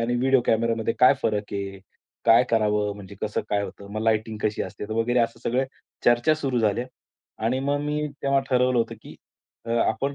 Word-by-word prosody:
आणि 120 +1 0
व्हिडिओ 130 +1 +3
कॅमेरामध्ये 115 0 +1
काय 125 +2 +7
फरक 105 -1 -1
आहे? 100 -1 -4 0.5
काय 115 +2 +7
करावं 105 -2 +1
म्हणजे 100 0 -10
कसं 105 - -1
काय 100 -1 +1
होतं? 100 0 -8
मग 110 - -3
लाईटिंग 110 -1 0
कशी 105 0 0
असते - - -7
वगैरे, 120 +2 +1
असं 115 0 0
सगळं 130 +3 +1 0.4
चर्चा 120 +6 +4
सुरू 135 -5 -1
झाल्या. 110 +2 +1 0.6
आणि 125 +3 +1
मग 140 +1 0
मी 150 +1 -1 0.2
तेव्हा 140 0 +3
ठरवलं 125 -1 +3
होतं, 115 0 0
की - - -11 0.5
अ, 115 - -4 0.2
आपण 135 +6 -1
115 Hz, 185 wpm, -25 LUFS, 110-130 Hz, 0.6 s, काय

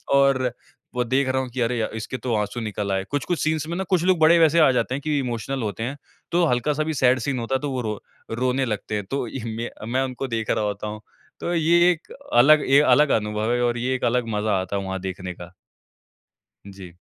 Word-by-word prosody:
और 135 -3 +3 0.4
वो 125 - +1
देख 130 +3 +1
रहा 130 0 +1
हूँ 130 - -5
कि 125 +1 -4
अरे 115 -1 0
इसके 110 +3 -5
तो 125 -1 -3
आँसू 105 +3 -2
निकल 105 -2 -3
आए। 95 0 0
कुछ-कुछ 150 +4 -1
सीन्स 155 -1 0
में 170 - -3
ना 190 - -1
कुछ 180 -3 +2
लोग 185 -1 +3
बड़े 165 +2 +6
वैसे 165 +1 +5
आ 150 - +6
जाते 125 +1 0
हैं 140 - -5
कि 150 -1 -1
इमोशनल 125 +1 -3
होते 105 +1 -3
हैं 135 +4 -4 0.3
तो 175 +1 +3
हल्का-सा 145 +3 +1
भी 160 0 -2
सैड 130 -1 +3
सीन 140 -3 -2
होता 120 +3 -2
है - - +1
तो 145 -2 -3
वो 130 -1 -2
रो 105 -2 -3 0.4
रोने 130 +1 +1
लगते 105 -1 -3
हैं। 105 -2 -3
तो 135 -3 -1
य 125 0 -6
म 115 0 -6
मैं 130 +1 +2
उनको 130 +1 -4
देख 115 -2 -3
रहा 110 - +1
होता 105 0 -3
हूँ। 105 +1 -6 0.4
तो 175 - -2
ये 170 +2 +4
एक 165 -2 -6 0.2
अलग 145 +5 +6
ए 140 +1 +7
अलग 150 -1 +5
अनुभव 105 +2 -1
है 120 - 0
और 120 0 0
ये 130 +2 -1
एक - - -5
अलग 120 0 +1
मज़ा 105 -2 +1
आता 95 +2 -4
है 100 - -3
वहाँ 95 0 -4
देखने 95 -1 -5
का। 85 +1 -11 1.2
जी। 95 -3 -12
125 Hz, 240 wpm, -23 LUFS, 110-140 Hz, 1.2 s, ए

